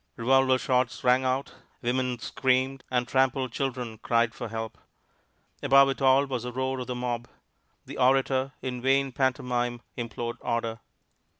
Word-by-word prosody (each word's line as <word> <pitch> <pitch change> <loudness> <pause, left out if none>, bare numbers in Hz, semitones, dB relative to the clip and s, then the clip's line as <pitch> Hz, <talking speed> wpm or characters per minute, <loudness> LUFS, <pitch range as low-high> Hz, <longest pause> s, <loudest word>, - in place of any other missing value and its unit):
Revolver 130 +2 +3
shots 125 -1 0
rang 125 +1 +4
out, 130 +1 -1 0.3
women 125 +1 0
screamed, 130 +2 0
and 125 -1 0
trampled 130 -1 +1
children 125 -4 -3
cried 115 0 +1
for 120 - -6
help. 110 0 -6 0.8
Above 135 +1 +6
it 135 - -3
all 135 +1 +5
was 130 -3 -3
the 125 +1 -5
roar 130 +1 -2
of 125 - -5
the 125 - -3
mob. 120 -1 -3 0.6
The - - -8
orator, 130 +1 +2
in 125 -2 -4
vain 135 +1 +2
pantomime, 125 -2 -1
implored 120 0 -4
order. 115 -1 -2
125 Hz, 145 wpm, -27 LUFS, 120-130 Hz, 0.8 s, Above